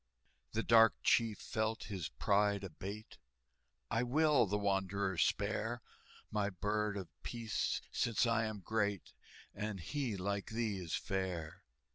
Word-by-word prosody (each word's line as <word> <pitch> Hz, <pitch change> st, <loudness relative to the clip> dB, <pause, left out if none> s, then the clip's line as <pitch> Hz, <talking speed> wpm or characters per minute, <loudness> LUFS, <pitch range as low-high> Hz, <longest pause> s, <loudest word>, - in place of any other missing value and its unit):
The 115 Hz, +1 st, 0 dB
dark 115 Hz, -1 st, +7 dB
chief 115 Hz, -3 st, +3 dB
felt 110 Hz, 0 st, -2 dB
his 95 Hz, -6 st, -4 dB
pride 100 Hz, 0 st, +2 dB
abate: 100 Hz, +4 st, -7 dB, 0.7 s
"I 115 Hz, 0 st, +2 dB
will 140 Hz, -1 st, +4 dB
the 105 Hz, +2 st, 0 dB
wanderer 100 Hz, -1 st, 0 dB
spare, 110 Hz, +5 st, 0 dB, 0.5 s
My 105 Hz, -1 st, +1 dB
Bird 105 Hz, +2 st, -1 dB
of 95 Hz, -3 st, -5 dB
Peace, 115 Hz, -2 st, -2 dB
since 115 Hz, +1 st, +2 dB
I 115 Hz, -1 st, +2 dB
am 110 Hz, -2 st, -4 dB
great, 105 Hz, -2 st, -1 dB, 0.4 s
And 105 Hz, -2 st, -3 dB
he, 120 Hz, -, -2 dB
like 100 Hz, +1 st, -2 dB
thee, 110 Hz, -3 st, -1 dB
is 85 Hz, -3 st, -3 dB
fair!" 90 Hz, -4 st, -3 dB
105 Hz, 130 wpm, -36 LUFS, 95-115 Hz, 0.7 s, dark